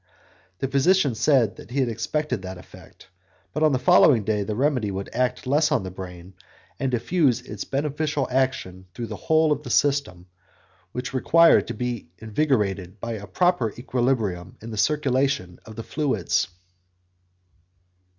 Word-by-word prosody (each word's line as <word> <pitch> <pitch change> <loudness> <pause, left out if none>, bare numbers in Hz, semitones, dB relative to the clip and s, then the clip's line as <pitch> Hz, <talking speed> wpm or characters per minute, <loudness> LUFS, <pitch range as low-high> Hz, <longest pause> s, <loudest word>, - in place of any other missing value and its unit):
The 135 - -2
physician 140 +2 +3
said 120 -2 +2
that - - -12
he 135 +3 -2
had 130 - +2
expected 125 +1 -2
that 95 0 -7
effect, 90 - -16 0.4
but 150 - -2
that 155 - +4
on - - +1
the 130 - +2
following 125 -2 +5
day 105 0 0
the 105 +1 -3
remedy 130 -4 +1
would 95 0 -5
act 125 +1 -1
less 150 +4 +2
on 140 -9 +1
the 95 - -6
brain, 90 0 -9 0.5
and 135 - 0
diffuse 130 +2 +1
its 105 -2 -7
beneficial 150 0 -1
action 110 -8 -1
through 120 - -4
the 110 -1 -6
whole 160 +6 +2
of 145 -1 0
the 135 - -8
system, 135 -11 +1 0.7
which 125 +3 -5
required 165 +6 +5
to - - -5
be 120 -8 -4
invigorated 105 - -1
by 115 - -4
a 105 -3 -6
proper 125 - +1
equilibrium 120 -8 -1
in 115 +1 -9
the - - -5
circulation 135 -6 0
of 110 - -11
the 115 - -6
fluids. 135 - 0
125 Hz, 160 wpm, -24 LUFS, 105-145 Hz, 0.7 s, following